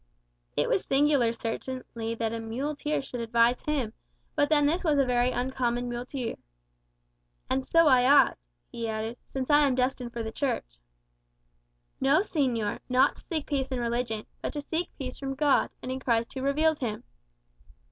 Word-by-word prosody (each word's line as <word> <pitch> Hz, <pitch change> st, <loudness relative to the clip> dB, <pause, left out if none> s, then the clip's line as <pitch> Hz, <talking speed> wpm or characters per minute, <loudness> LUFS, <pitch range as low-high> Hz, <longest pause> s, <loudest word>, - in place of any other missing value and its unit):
It -, -, +2 dB
was -, -, +1 dB
singular 275 Hz, -4 st, +3 dB
certainly 230 Hz, 0 st, -4 dB
that 225 Hz, -1 st, -2 dB
a 230 Hz, -, -3 dB
muleteer 280 Hz, +6 st, -2 dB
should 245 Hz, -, -6 dB
advise 235 Hz, +1 st, +2 dB
him; 275 Hz, -8 st, -1 dB, 0.4 s
but 290 Hz, -, +2 dB
then 295 Hz, -2 st, +4 dB
this 330 Hz, +5 st, +1 dB
was 305 Hz, -4 st, +2 dB
a 275 Hz, -, +4 dB
very 245 Hz, 0 st, +2 dB
uncommon 245 Hz, -1 st, -1 dB
muleteer. 245 Hz, 0 st, -4 dB, 1.1 s
"And 265 Hz, 0 st, +1 dB
so 330 Hz, +4 st, +4 dB
I 255 Hz, -4 st, +5 dB
ought," 280 Hz, -, +5 dB, 0.3 s
he 230 Hz, -1 st, -4 dB
added, 220 Hz, +2 st, -4 dB
"since 265 Hz, +1 st, -2 dB
I 290 Hz, -, +7 dB
am 260 Hz, -, +1 dB
destined 250 Hz, -1 st, -1 dB
for 235 Hz, -1 st, -4 dB
the 220 Hz, -, -4 dB
Church." -, -, -3 dB, 1.2 s
"No, 275 Hz, +6 st, +4 dB
señor; 255 Hz, -, -1 dB
not 255 Hz, +1 st, +3 dB
to -, -, -13 dB
seek 315 Hz, -5 st, -2 dB
peace 275 Hz, -3 st, -1 dB
in 260 Hz, -2 st, -2 dB
religion, 235 Hz, -2 st, -2 dB, 0.2 s
but -, -, -3 dB
to 295 Hz, -, -3 dB
seek 335 Hz, +4 st, -2 dB
peace 255 Hz, -3 st, -6 dB
from 270 Hz, -1 st, -3 dB
God, 285 Hz, 0 st, +3 dB
and 255 Hz, -, -4 dB
in 260 Hz, -, -3 dB
Christ 235 Hz, -3 st, 0 dB
who 265 Hz, -, -4 dB
reveals 300 Hz, +3 st, +2 dB
him." 230 Hz, -2 st, -3 dB
255 Hz, 170 wpm, -28 LUFS, 235-285 Hz, 1.2 s, I